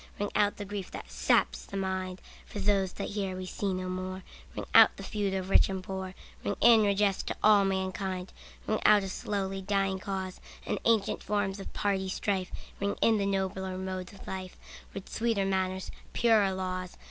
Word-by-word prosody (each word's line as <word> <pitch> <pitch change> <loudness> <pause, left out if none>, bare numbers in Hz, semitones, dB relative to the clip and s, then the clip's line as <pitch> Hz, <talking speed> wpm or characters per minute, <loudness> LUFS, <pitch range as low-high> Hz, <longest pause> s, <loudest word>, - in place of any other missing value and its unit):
Ring 205 0 -1
out 205 -1 +2
the 205 - -5
grief 200 -2 -5
that - - -8
saps - - +2
the - - -6
mind, 190 -1 -3 0.3
For - - -8
those 195 -2 +1
that - - -4
here 195 -2 -2
we 185 0 -5
see 195 +1 -2
no 185 0 -3
more, 185 +1 -4 0.3
Ring - - -4
out - - +8
the - - -7
feud 200 -2 -1
of 190 0 -3
rich - - +6
and 190 -1 -3
poor, 190 0 -5 0.3
Ring 205 - -1
in 230 -2 +7
redress 200 -1 +2
to - - -4
all 210 -2 +6
mankind. 190 -1 -2 0.3
Ring 215 - 0
out 210 -1 +6
a 195 - -4
slowly 195 0 -3
dying 195 -1 0
cause, 190 -1 -4 0.2
And - - -1
ancient 225 -3 +2
forms 205 -1 -1
of 195 - -7
party 195 -2 0
strife; 190 -1 -1 0.3
Ring 200 0 0
in 225 -2 +4
the 200 - +1
nobler 190 -1 -1
modes 185 -1 -4
of 200 - -13
life, 185 -1 -6 0.3
With 195 - -7
sweeter 225 -4 0
manners, 190 -1 -1 0.2
purer 220 -4 +4
laws. 185 -1 -4
190 Hz, 190 wpm, -30 LUFS, 185-200 Hz, 0.3 s, out